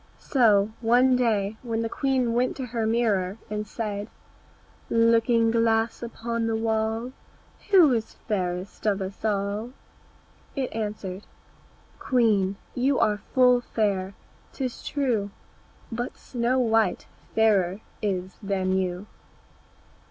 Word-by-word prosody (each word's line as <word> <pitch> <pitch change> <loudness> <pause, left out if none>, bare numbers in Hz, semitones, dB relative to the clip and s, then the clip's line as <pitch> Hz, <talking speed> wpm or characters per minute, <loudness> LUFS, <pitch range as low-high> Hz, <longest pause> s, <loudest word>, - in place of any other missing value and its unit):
So 220 -6 +3
one 250 +3 +4
day 220 -4 +1
when 230 -2 -2
the - - 0
queen 255 -1 0
went 250 +2 0
to 265 - -3
her 230 -2 -2
mirror 215 -4 +1
and 210 0 -3
said, 210 -1 -4 0.8
"Looking 230 0 +3
glass 225 0 +1
upon 230 -1 -3
the 225 - 0
wall, 225 +2 -1 0.6
Who 355 -9 +7
is 225 -2 -2
fairest 185 -1 -2
of 200 -1 +2
us 190 0 -6
all?" 210 +3 -1 0.8
It 265 -3 -2
answered, 210 -3 -5 0.7
"Queen, 210 -6 +2 0.2
you 260 +2 +1
are 210 -1 +2
full 250 -1 +5
fair, 200 -5 -1 0.4
'tis 255 -3 -4
true, 240 -8 0 0.6
But 240 +2 -4
Snow 245 +1 -1
white 225 -2 +2 0.3
fairer 205 -3 +3 0.2
is 190 -2 -2
than 190 -2 0
you." 180 +1 -3
225 Hz, 115 wpm, -26 LUFS, 200-240 Hz, 0.8 s, Who